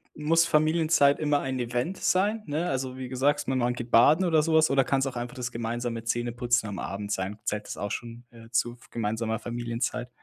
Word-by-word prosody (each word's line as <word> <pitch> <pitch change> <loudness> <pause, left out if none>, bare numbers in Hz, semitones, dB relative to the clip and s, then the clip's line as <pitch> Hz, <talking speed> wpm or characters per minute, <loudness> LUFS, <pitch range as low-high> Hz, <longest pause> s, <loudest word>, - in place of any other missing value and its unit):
m 150 0 -7
muss 165 +1 +4
Familienzeit 155 -2 +3
immer 145 -2 +2
ein 130 -1 -3
Event 125 +9 -2
sein, 205 +4 +1
ne? 155 +4 -1
Also, 130 -1 -3
wie 130 -1 -5
gesagt, 145 +3 0
ma 130 - 0
man 125 -1 +1
geht 120 0 -7
Baden 150 +10 +6
oder 160 -3 +4
so 160 +1 0
was 160 0 +5
oder 135 -1 +4
kann's 135 +1 +1
auch 130 - -5
einfach 120 +2 -5
das 125 -1 -4
gemeinsame 115 0 -3
Zähneputzen 120 0 0
am 100 - -5
Abend 100 +1 -5
sein? 95 +2 -2
Zählt 105 0 -2
das - - -6
auch 100 +1 -4
schon, 120 0 -6
äh, 115 -1 -14
zu 120 0 0
f 120 - -19
gemeinsamer 110 0 -2
Familienzeit? 120 +1 -3
125 Hz, 215 wpm, -27 LUFS, 115-145 Hz, -, Baden